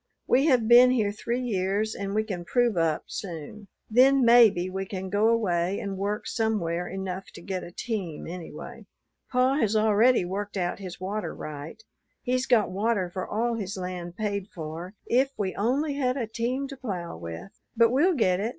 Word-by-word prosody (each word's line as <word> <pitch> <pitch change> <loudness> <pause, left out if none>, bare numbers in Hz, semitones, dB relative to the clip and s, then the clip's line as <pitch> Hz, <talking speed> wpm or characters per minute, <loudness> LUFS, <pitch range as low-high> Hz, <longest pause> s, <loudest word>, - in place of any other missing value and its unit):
We 270 +5 +3
have 250 -6 +3
been 245 +2 +8
here 220 -5 +2
three 235 +4 -3
years 205 -1 0
and 200 0 -4
we 215 - +2
can 190 -5 -5
prove 240 +3 +1
up 165 -2 +1
soon; 185 +3 -7 0.2
then 260 +3 +5
maybe 225 -7 +6
we 190 +1 -3
can 190 -1 -5
go 205 +2 +3
away 190 -5 +1
and 200 -1 -4
work 200 +2 -2
somewhere, 190 -7 -1
enough 190 0 -5
to - - -10
get 185 -1 -4
a 175 - -9
team 190 -7 -4
anyway. 175 0 -8 0.4
Pa 255 +2 +2
has 220 -6 +1
already 220 0 +4
worked 200 +3 -4
out 175 0 -1
his 185 -3 -8
water 200 +3 -4
right, 155 +8 -8 0.4
he's 255 +1 0
got 225 -6 +3
water 200 -2 0
for 185 0 -4
all 235 +3 0
his 200 -3 -4
land 180 -1 -5
paid 200 -2 -2
for, 170 +2 -7
if 265 +3 +2
we 195 -3 -1
only 275 +8 0
had 260 -2 0
a 245 - -1
team 240 +5 -2
to 275 - -8
plough 190 - -5
with. 85 - -8 0.3
But 230 0 +5
we'll 330 +8 +3
get 185 -8 +2
it. 215 +3 -1
205 Hz, 185 wpm, -27 LUFS, 185-235 Hz, 0.4 s, been